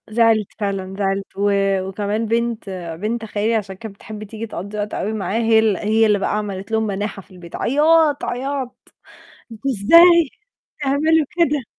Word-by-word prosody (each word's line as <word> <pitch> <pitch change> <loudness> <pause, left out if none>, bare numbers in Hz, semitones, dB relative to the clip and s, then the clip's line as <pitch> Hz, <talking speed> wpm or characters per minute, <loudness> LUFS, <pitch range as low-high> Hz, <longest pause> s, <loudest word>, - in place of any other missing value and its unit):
زعلت، 225 -2 +3
فعلًا 195 -2 -3
زعلت 195 0 -1
و 205 +1 +1 0.4
وكمان 210 +3 -2
بنت 230 -1 -1 0.3
بنت 225 +2 -2
خالي 215 +1 -1
عشان 195 -4 -3
كانت 220 -1 -9
بتحب 215 +1 -9
تيجي 220 +2 -7
تقضّي 205 +1 -7
وقت 205 0 -3
أوي 215 - -2
معاه 215 +1 -2
هي 225 -1 +4
ال 220 -3 +3
هي 220 +3 +2
اللي 210 -1 +3
بقى 195 - -1
عملت 200 -1 -5
لهم 220 0 +1
مناحَة 205 0 -4
في - - -28
البيت 175 -2 -10
عياط، 300 +2 +3
عياط 265 0 -3 0.8
"أنتم 225 +5 -5
إزاي 335 - +6 0.5
تعملوا 295 +2 +2
كده؟" 300 -7 0
220 Hz, 165 wpm, -20 LUFS, 205-245 Hz, 0.8 s, إزاي